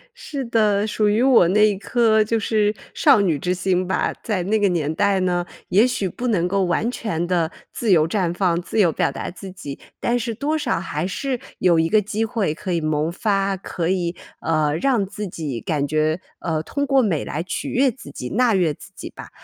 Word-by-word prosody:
是 280 - -5
的， 215 -3 +2
属 210 -1 +1
于 220 +4 +2
我 255 -10 +6
那 210 +1 +4
颗 220 0 +3
就 225 +1 0
是 210 0 +1 0.2
少 280 -7 +5
女 170 -8 +1
之 180 +4 0
心 185 0 0
吧。 190 - 0
在 200 -6 -1
那 215 +3 +1
个 200 - +3
年 160 -3 -1
代 200 +3 +2
呢， 175 -1 0 0.2
也 210 +7 +5
许 205 -6 -1
不 245 +8 -4
能 180 -6 +1
够 195 +1 +1
完 195 +7 0
全 175 -9 -2
地 175 -2 0 0.2
自 225 -4 0
由 160 -3 +5
绽 180 -1 0
放、 175 -2 +1
自 200 - -3
由 180 -5 +5
表 145 - 0
达 135 - -5
自 190 +1 -9
己， 145 -7 -8 0.2
但 240 +1 +1
是 230 -1 -3
多 290 +7 -1
少 295 - -1
还 170 -1 -3
是 255 +6 -3 0.2
有 175 -3 +3
一 165 0 +2
个 215 - +5
机 210 +2 -2
会 215 -7 -1
可 180 +3 -5
以 170 - +1
萌 155 +1 0
发， 195 0 0
可 175 -2 -3
以， 175 -2 -1 0.3
呃， 155 -2 +1
让 245 0 +2
自 210 +1 -5
己 150 -8 -5
感 145 0 -1
觉， 155 +3 0 0.2
呃， 160 -3 -1
通 285 - -2
过 270 -1 +3
美 185 - 0
来 155 - -3
取 180 +1 -4
悦 265 +2 +3
自 215 - -9
己、 125 - -6
纳 240 +1 +2
悦 180 -5 +2
自 - - -14
己 - - -7
吧。 - - -11
190 Hz, 230 characters per minute, -22 LUFS, 170-220 Hz, 0.3 s, 我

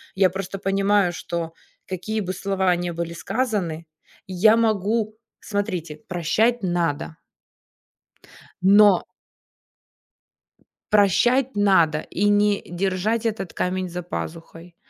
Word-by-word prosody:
Я 190 -1 +4
просто 195 +1 -5
понимаю, 195 -1 +2
что 165 0 -5 0.3
какие 190 +4 -3
бы 185 -1 -3
слова 190 -1 0
ни 175 0 -3
были 170 0 -4
сказаны, 180 -6 -2 0.4
я 200 +4 +4
могу 215 0 0 0.3
смотрите, 185 -7 -3
прощать 210 +7 +1
надо. 165 -3 -1 1.4
Но 200 0 +6 1.9
Прощать 240 +6 +3
надо 170 -7 +3
и 200 +6 -3
не 205 0 +3
держать 195 +5 -1
этот 215 -5 -3
камень 185 0 -2
за 180 0 -5
пазухой, 170 0 -7
190 Hz, 100 wpm, -23 LUFS, 175-210 Hz, 1.9 s, Но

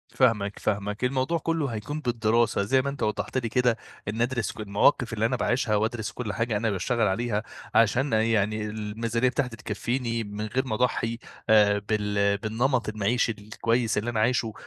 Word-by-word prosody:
فاهمك 105 -6 +2
فاهمك، 105 +2 -2
الموضوع 130 +6 +1
كلّه 165 -3 -1
هيكون 120 +6 -4
بالدراسة 115 -3 +1
زي 130 +6 +3
ما 140 - -2
أنت 140 0 -5
وضحت 110 +4 -1
لي 120 -3 -1
كده، 125 -1 +2 0.3
إني 110 +3 0
ادرس 120 -5 -1
ق - - -14
المواقف 115 +4 +2
اللي 110 0 0
أنا 120 +3 +1
باعيشها 120 -3 +1
وادرس 110 +1 -1
كُلّ 110 -4 -4
حاجة 115 -2 0
أنا 115 +2 0
باشتغل 110 +4 +1
عليها، 110 +2 -1 0.3
عشان 120 +4 +3
يعني 110 -1 +1
الميزانية 110 +3 -1
بتاعتي 125 -2 -2
تكفيني 115 +2 -2
من 105 +1 -5
غير 130 +5 -1
ما 110 - -1
اضحّي 115 -1 0 0.3
آآ 105 -1 +5
بال 100 -1 +1
بالنمط 115 +3 0
المعيشي 110 +3 +1
الكويس 115 +2 -1
اللي 110 +3 -1
أنا 115 -2 -1
عايشه، 115 -1 +1
115 Hz, 170 wpm, -26 LUFS, 105-125 Hz, 0.3 s, آآ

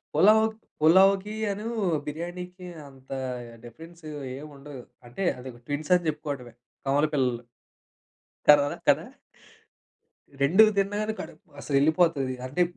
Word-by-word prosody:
పలావ్, 220 +2 +6 0.3
పులావ్‌కీయను, 200 +5 +3 0.4
బిర్యానీకి 180 +4 -6 0.2
అంత 135 -1 -18 0.6
డిఫరెన్స్ 165 +8 -13 0.3
ఏం 150 - -8
ఉండదు. 135 -3 -10 0.2
అంటే 155 +11 -5
అది 130 +1 -8 0.2
ట్విన్స్ 150 +4 -3
అని 170 -2 -6
చెప్పుకోవడమే 145 -6 -5 0.3
కవల 145 +3 +3
పిల్లలు. 125 -4 0 1.1
కడా 145 -1 +8 0.2
కదా! - - +4 1.4
2 180 +10 +6
తిన్నను 205 +2 0
కడుపు 160 -1 -12
అసలు 140 - -3
యేళ్ళిపోతది. 150 -3 +2
అంటే 145 +8 -1
160 Hz, 105 wpm, -26 LUFS, 140-190 Hz, 1.4 s, కడా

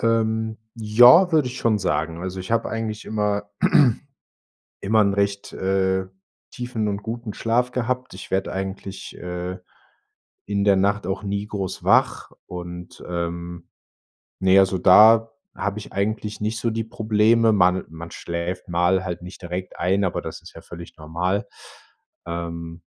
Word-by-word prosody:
Ähm, 110 -1 0 0.2
ja, 120 - +7
würde 150 -5 +3
ich 125 - -7
schon 110 -3 +2
sagen, 80 0 -2
also 95 0 -4
ich 95 - -8
habe 115 0 +1
eigentlich 110 -1 -4
immer 105 -1 -1 1.3
immer 110 +2 +3
'n 100 -1 +2
recht, 100 0 -1
äh, 95 0 0 0.5
tiefen 120 -3 -3
und 100 0 -2
guten 115 -1 -5
Schlaf 120 +4 0
gehabt, 125 +1 -2
ich 95 - -10
werde 95 0 0
eigentlich, 95 0 -6
äh, 90 +1 -5 0.9
in 100 0 -1
der 100 -1 +5
Nacht 100 0 +1
auch 95 +2 -3
nie 100 +1 -3
groß 100 -3 -4
wach - - +2 0.2
und, 90 0 -8
ähm, 85 0 -5 0.7
ne, 95 +1 +5
also 95 -1 +3
da 110 +5 +7 0.2
habe 100 0 -3
ich - - -11
eigentlich 105 +1 -2
nicht 110 +1 -1
so 120 - 0
die 115 0 -3
Probleme. 110 +1 +3
Man 90 -1 +3
man 85 +1 -9
schläft 85 +2 -4
halt - - -19
mal 90 0 +1
nicht 90 +1 -11
direkt 90 +1 -6
ein, 95 +3 +1
aber 90 - -2
das - - -7
ist - - -14
ja - - -10
völlig 85 0 -11
normal. 85 +6 -2 0.8
Ähm, 85 0 -6
100 Hz, 150 wpm, -23 LUFS, 90-110 Hz, 1.3 s, ja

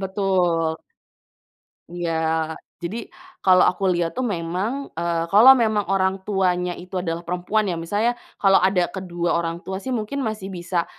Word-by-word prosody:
Betul. 180 -4 0 1.1
Iya, 175 0 -4 0.7
jadi 175 +6 -4 0.5
kalau 185 -1 +6
aku 185 - -11
lihat 170 -1 -1
tuh 255 - -2
memang, 190 +12 -3
eee, 170 0 -1
kalau 230 +7 +9
memang 215 -4 +1
orang 190 0 +1
tuanya 180 -3 +1
itu 180 +2 -11
adalah 170 -1 -4
perempuan 180 +5 0
ya, 175 - -2
misalnya 205 +8 0 0.3
kalau 195 -1 +5
ada 185 -1 +3
kedua 175 -3 -2
orang 170 0 -4
tua 190 0 -4
sih 230 - -8
mungkin 240 +4 -2
masih 215 -5 -4
bisa 175 -1 -2
185 Hz, 145 wpm, -22 LUFS, 170-205 Hz, 1.1 s, kalau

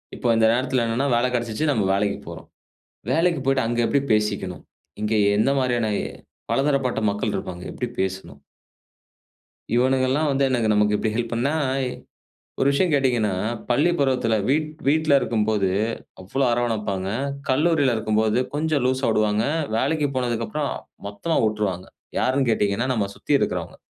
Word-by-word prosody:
இப்ப 120 - 0
இந்த 110 - +4
நேரத்தில 130 0 0
என்னன்ன 130 +5 0
வேலை 120 +2 +2
கிடைச்சிச்சு, 120 +4 -2
நம்ம 110 -7 +1
வேலைக்குப் 100 +1 -1
போறோம். - - -9 0.6
வேலைக்கு 165 -1 +2
போய்ட்டு 135 -2 +2
அங்க 120 0 -1
எப்படி 140 - +2
பேசிக்கணும்? 105 -4 -1 0.4
இங்கே 110 +1 +1 0.2
எந்த 110 - +3
மாதிரியான, 120 -3 0 0.6
பலதரப்பட்ட 135 -4 +1
மக்கள் 105 +1 -2
இருப்பாங்க, 90 -1 -5
எப்படி 125 - -3
பேசணும்? 95 -7 -4 1.3
இவனுங்கெல்லாம் 130 +4 +2
வந்து 140 0 +1
எனக்கு 120 -4 +1
நமக்கு 105 0 +3
இப்படி 110 0 -1
ஹெல்ப் 115 0 -2
பண்ணா, 125 +5 0 1.1
ஒரு 135 - +3
விஷயம் 165 +3 +1
கேட்டீங்கன்னா, 120 -8 +2 0.3
பள்ளி 145 +8 +3
பருவத்தில 125 -5 +1
வீட் 155 +2 +1 0.2
வீட்டில 155 0 +4
இருக்கும்போது 105 -5 0 0.5
அவ்வளவு 120 +9 -1
அரவணைப்பாங்க. 105 -5 -1 0.4
கல்லூரில 145 -1 +2
இருக்கும்போது 110 0 +1 0.2
கொஞ்சம் 150 -2 0
லூஸ்ஸா 130 -2 +1
விடுவாங்க. 105 0 +1 0.3
வேலைக்கு 145 +5 +1
போனதுக்கு 120 -2 -1
அப்புறம் 150 -2 -2 0.4
மொத்தமா 105 +11 -2
விட்டுருவாங்க. 105 -4 -2 0.3
யார்ன்னு 130 -1 +1
கேட்டீங்கன்னா, 105 +3 0
நம்ம 105 -5 0
சுத்தி - - -4
இருக்கிறவங்க. 90 -6 -2
120 Hz, 135 wpm, -23 LUFS, 105-135 Hz, 1.3 s, இந்த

